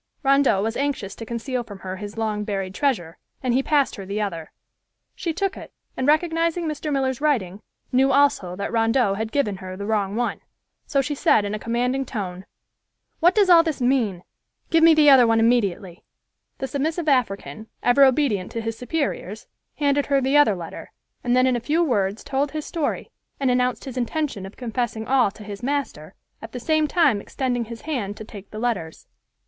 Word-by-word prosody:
Rondeau 275 -7 +3
was 225 +1 -2
anxious 270 -9 -2
to 225 - -9
conceal 245 +2 -3
from 205 -4 -10
her 185 0 -5
his 205 +2 -8
long 215 -2 -1
buried 195 -3 -3
treasure, 190 - -1 0.2
and 250 -2 +1
he 260 - +3
passed 285 -1 +1
her 195 - -6
the 200 +2 -4
other. 170 -7 -4 0.6
She 340 - -3
took 390 +4 -2
it - - -10 0.2
and 260 - -2
recognizing 330 +2 +1
Mr. 305 -1 -3
Miller's 265 -1 -1
writing, 215 -11 0 0.3
knew 265 +2 +3
also 270 -10 +2
that 200 +1 -4
Rondeau 225 -1 +2
had 220 +2 -3
given 235 -9 0
her 185 0 -8
the 200 - -5
wrong 205 -2 0
one, 240 0 -2 0.5
so 275 - +2
she 275 +2 -3
said 220 -6 +3
in 205 - -3
a 215 - -3
commanding 245 +4 -1
tone, 190 -7 -6 0.7
"What 350 +2 +4
does 410 -2 +4
all 345 -2 +8
this 320 -3 -3
mean? 240 -8 +1 0.5
Give 330 -1 +4
me 325 -1 +7
the 305 -1 +5
other 255 -3 +7
one 225 0 +3
immediately." 205 -6 +1 0.5
The - - -3
submissive 310 +5 -2
African, 225 -4 0 0.2
ever 245 +3 +5
obedient 260 -8 +2
to 230 - -3
his 225 0 -3
superiors, 245 - -3 0.3
handed 285 -1 +1
her 280 -1 +3
the 270 +2 0
other 290 -9 +5
letter, 170 -2 -8 0.3
and 245 0 +2
then 255 0 +4
in 255 -1 +2
a - - 0
few 310 +8 +1
words 205 - 0
told 280 +1 -1
his 310 -1 -4
story, 320 -4 -3 0.3
and 270 -2 +2
announced 250 0 0
his 260 -2 -7
intention 250 -5 -2
of 195 - -14
confessing 235 -2 -3
all 260 -5 +3
to 210 +2 -13
his 205 0 -8
master, 250 - -3 0.3
at 225 0 -10
the 250 - -4
same 310 +4 +1
time 295 - +3
extending 245 -1 -2
his 230 0 -9
hand 235 -10 -3
to - - -7
take 205 -2 -11
the 215 - -9
letters. 215 -9 -3
245 Hz, 195 wpm, -23 LUFS, 205-280 Hz, 0.7 s, all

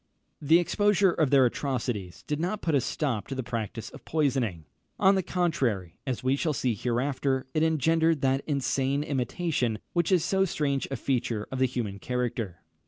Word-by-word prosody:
The 155 +3 +5
exposure 200 +2 +3
of 155 -4 +1
their 135 -2 +6
atrocities 120 -8 -2
did 150 0 -2
not 185 +5 -2
put 160 - 0
a 140 - +4
stop 125 -8 -2
to 135 - -4
the 130 - -3
practice 115 -2 -4
of - - -12
poisoning. 130 - 0 0.3
On 195 - +6
the 190 - +2
contrary, 130 - -1
as 130 -2 -2
we 130 +1 +3
shall 155 +2 0
see 125 -3 0
hereafter, 130 +4 -1
it 155 - +1
engendered 160 0 +2
that 135 0 +1
insane 140 -1 0
imitation 135 -3 -1 0.2
which 170 +1 +1
is 175 -4 +3
so 195 +1 +2
strange 145 -6 -1
a 135 - -2
feature 120 -4 -1
of 130 - -3
the 130 - +4
human 115 -6 -4
character. 120 -6 -3
135 Hz, 175 wpm, -28 LUFS, 120-160 Hz, 0.3 s, their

